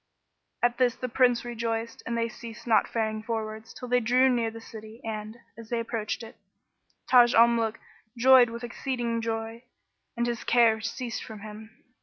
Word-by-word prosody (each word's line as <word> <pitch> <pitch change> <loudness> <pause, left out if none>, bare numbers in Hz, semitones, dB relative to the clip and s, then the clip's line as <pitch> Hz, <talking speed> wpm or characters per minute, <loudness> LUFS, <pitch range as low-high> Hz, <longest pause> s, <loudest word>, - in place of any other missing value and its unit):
At 240 +1 +2
this 245 -2 +3
the 255 - -4
Prince 245 0 +2
rejoiced, 230 -1 -3
and 235 0 -1
they 230 0 +1
ceased 230 0 -10
not 230 -2 +3
faring 220 -1 -2
forwards 220 0 -5
till 250 - -9
they 250 0 +3
drew 250 +3 +3
near 235 -3 +1
the 225 0 -9
city 220 0 -11
and, 215 0 -5 0.2
as 230 0 -12
they 235 - -1
approached 230 -1 -3
it, 225 - -12 0.7
Taj 245 -1 +6
al 230 +1 +8
Muluk 230 -2 0 0.4
joyed 255 0 +7
with 235 +1 -7
exceeding 240 -1 -3
joy, 225 +1 -4 0.5
and 235 - +1
his 240 -1 -3
care 230 -2 +4
ceased 230 +1 -4
from 215 -2 -10
him. 220 +2 -11
230 Hz, 175 wpm, -27 LUFS, 225-240 Hz, 0.7 s, al